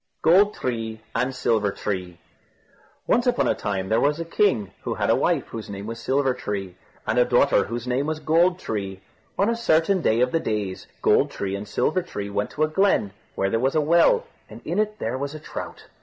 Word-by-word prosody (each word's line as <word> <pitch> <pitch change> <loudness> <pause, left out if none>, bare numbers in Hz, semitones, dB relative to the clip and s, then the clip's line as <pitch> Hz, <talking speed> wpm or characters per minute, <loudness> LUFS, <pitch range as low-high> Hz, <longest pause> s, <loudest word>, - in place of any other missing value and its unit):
GOLD 195 +6 +5
TREE 115 -3 -3
AND 125 +3 -1
SILVER 110 -5 +1
TREE 90 -4 -4 0.9
Once 245 +2 +2
upon 245 - +2
a - - +3
time 95 -2 -3
there 110 +1 +2
was 150 +2 +2
a 165 - -3
king 130 - +1
who - - -3
had - - +1
a - - +5
wife, - - 0
whose 110 -2 -7
name 100 0 -6
was 115 +1 -6
Silver 130 +2 +1
tree, 100 -7 -5 0.3
and 110 +3 +1
a - - +7
daughter, 125 +3 +3
whose 120 0 -5
name 130 +3 0
was 155 0 -2
Gold 170 +3 +3
tree. 100 - -4 0.4
On 200 - +3
a 230 - +1
certain 185 -4 +2
day 110 -6 +2
of 125 0 +2
the 165 - +1
days, 105 -8 -3 0.2
Gold - - +4
tree 100 -1 -3
and 100 +1 -6
Silver 155 - 0
tree 100 - -6
went 100 +1 -1
to 155 - -1
a - - +3
glen, 155 - +2 0.2
where 95 0 0
there 115 - +1
was 135 +4 0
a - - +4
well, 170 - +4 0.2
and - - -10
in - - -1
it 215 0 0
there 125 - -3
was 140 +2 -4
a - - -7
trout. 155 - -8
125 Hz, 215 wpm, -24 LUFS, 105-165 Hz, 0.9 s, a